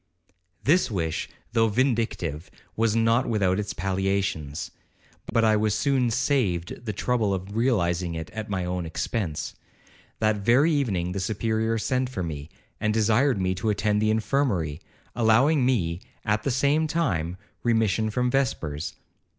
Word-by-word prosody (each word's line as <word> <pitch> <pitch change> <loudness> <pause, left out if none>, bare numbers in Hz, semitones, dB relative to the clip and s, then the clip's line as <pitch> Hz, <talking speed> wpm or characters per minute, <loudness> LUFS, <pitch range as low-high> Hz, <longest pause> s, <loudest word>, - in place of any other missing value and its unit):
'This 170 +6 +3
wish, 85 -7 -2 0.2
though 115 -1 +4
vindictive, 110 - -1 0.3
was 115 -1 +2
not 115 +3 +3
without 100 -4 +2
its 105 0 -3
palliations; 95 -6 -2 0.6
but 115 - +3
I 110 -1 +4
was 105 -1 +1
soon 135 -4 +2
saved 115 - 0
the - - 0
trouble 105 -1 0
of 95 +2 -7
realizing 90 -8 +1
it 80 0 -6
at 110 -1 -6
my 95 -3 -1
own 90 -1 -2
expence. 80 -1 -3 0.6
That 110 -1 +2
very 125 +10 +4
evening 100 - 0
the 95 - -3
Superior 110 +3 0
sent 130 +3 0
for 100 -8 -3
me, 75 -2 -5 0.3
and 105 - +1
desired 110 +3 +3
me 95 0 +1
to 95 +4 -2
attend 105 0 +1
in - - +2
the 110 0 +2
infirmary, 110 - 0 0.3
allowing 125 +5 +4
me, 90 -9 0 0.2
at 105 0 +1
the 140 - -1
same 140 +5 +2
time, 90 - -1 0.2
remission 110 -2 +2
from 125 +3 0
vespers. 85 - -1
110 Hz, 150 wpm, -26 LUFS, 90-120 Hz, 0.6 s, though